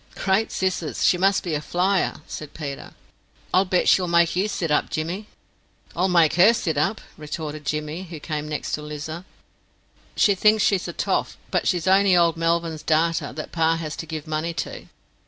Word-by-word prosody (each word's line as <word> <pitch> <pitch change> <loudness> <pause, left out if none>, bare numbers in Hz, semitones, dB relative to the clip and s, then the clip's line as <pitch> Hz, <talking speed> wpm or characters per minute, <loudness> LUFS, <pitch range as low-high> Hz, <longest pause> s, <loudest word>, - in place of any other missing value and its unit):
"Great 195 +3 +1
scissors! 185 -4 -1
she - - +5
must 195 +2 +2
be 170 - -3
a 150 - -1
flyer," 185 +1 0
said 155 -2 -8
Peter. 140 -3 -7 0.6
"I'll 185 +2 +4
bet 180 -1 +1
she'll 180 -2 +4
make 170 0 +3
you 190 +3 +1
sit 170 -6 -2
up, 150 - +2
Jimmy." 175 +7 -4 0.7
"I'll 180 +3 +2
make 170 -4 +4
her 205 +7 +7
sit 175 -9 -1
up," 175 +9 0 0.2
retorted 150 -1 -6
Jimmy, 150 +5 -3
who 165 -3 -9
came 150 -1 -4
next 150 - -4
to 150 - -2
Lizer. 150 +3 -6 0.9
"She 205 - +5
thinks 215 +2 +3
she's 195 -3 +1
a - - -5
toff, - - -1
but - - 0
she's 175 -4 +1
only 190 -1 +5
old 170 -1 +3
Melvyn's 165 -1 -1
darter, 160 -1 +1
that 155 +2 -7
pa 165 0 +2
has 160 -1 -5
to 165 - -6
give 155 -1 -5
money 155 +2 -3
to." - - -5
165 Hz, 185 wpm, -23 LUFS, 155-185 Hz, 0.9 s, her